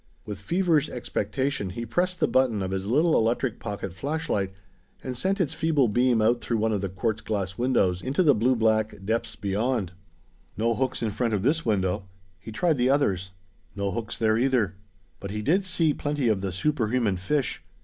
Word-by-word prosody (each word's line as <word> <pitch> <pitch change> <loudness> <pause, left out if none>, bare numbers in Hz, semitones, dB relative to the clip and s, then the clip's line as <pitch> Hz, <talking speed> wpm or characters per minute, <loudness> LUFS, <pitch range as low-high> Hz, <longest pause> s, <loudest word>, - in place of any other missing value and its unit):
With 105 -3 -6
feverish 165 - +1
expectation, 120 -1 -2
he 115 +6 -5
pressed 180 +9 -1
the - - +3
button 120 -6 +2
of 95 - -3
his 95 0 -3
little 155 +8 +3
electric 115 +1 +1
pocket 100 -3 -5
flashlight, 135 - -2 0.5
and 130 -1 -4
sent 190 - 0
its 160 -5 0
feeble 160 -5 +2
beam 120 +1 +2
out 120 +2 +3
through 115 - -1
one 110 0 +1
of 100 - -1
the 100 - -2
quartz 110 +4 -2
glass 95 -4 -2
windows 95 -8 +1
into 140 +8 +1
the 150 -4 +6
blue 125 +3 +2
black 110 -2 +2
depths 115 +3 -1
beyond. 105 0 -1 0.7
No 115 +2 +2
hooks 130 0 -1
in 110 - 0
front 115 +1 0
of 100 - -2
this 155 +3 +1
window. 95 -2 0 0.3
He 100 +4 -9
tried 160 +7 +1
the 125 +1 +2
others. 100 -10 +1 0.5
No 100 -1 -1
hooks 115 0 -4
there, 110 0 +2
either. 125 -7 +2 0.5
But 100 - -6
he 105 +1 -4
did 185 - +2
see 165 -4 +2
plenty 145 -5 -1
of 105 -3 +1
the 95 -1 -2
superhuman 115 -2 0
fish. 135 +9 -1
115 Hz, 190 wpm, -26 LUFS, 100-135 Hz, 0.7 s, the